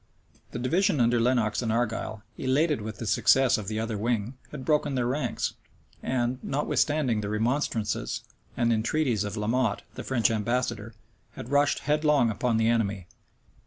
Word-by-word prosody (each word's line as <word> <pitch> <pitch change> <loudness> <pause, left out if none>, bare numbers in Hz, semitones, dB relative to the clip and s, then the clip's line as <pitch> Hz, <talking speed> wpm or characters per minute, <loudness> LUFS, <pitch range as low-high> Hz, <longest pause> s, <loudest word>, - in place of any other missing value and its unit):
The - - -6
division 165 - +1
under 120 0 +3
Lenox 115 -2 +1
and 115 -2 -1
Argyle, 115 -2 -2
elated 140 +1 +1
with 110 +1 -6
the 115 - -5
success 125 +3 +4
of 100 - -7
the 110 +1 -2
other 110 -2 -3
wing, 115 +1 -1 0.2
had 135 -4 -8
broken 150 -2 +1
their 125 -2 0
ranks, 135 +5 -1 0.5
and, 125 0 -1
notwithstanding 145 -4 0
the 100 - -4
remonstrances 115 0 -1 0.3
and 120 -1 +2
entreaties 115 0 +1
of 105 +1 -5
La 105 - -2
Motte, 115 -2 0
the - - -7
French 120 -5 +1
ambassador, 115 0 -2 0.4
had 120 - -8
rushed 145 +1 +2
headlong 150 -4 +2
upon 115 +2 0
the 110 0 +2
enemy. 105 -5 0
120 Hz, 160 wpm, -27 LUFS, 110-135 Hz, 0.5 s, success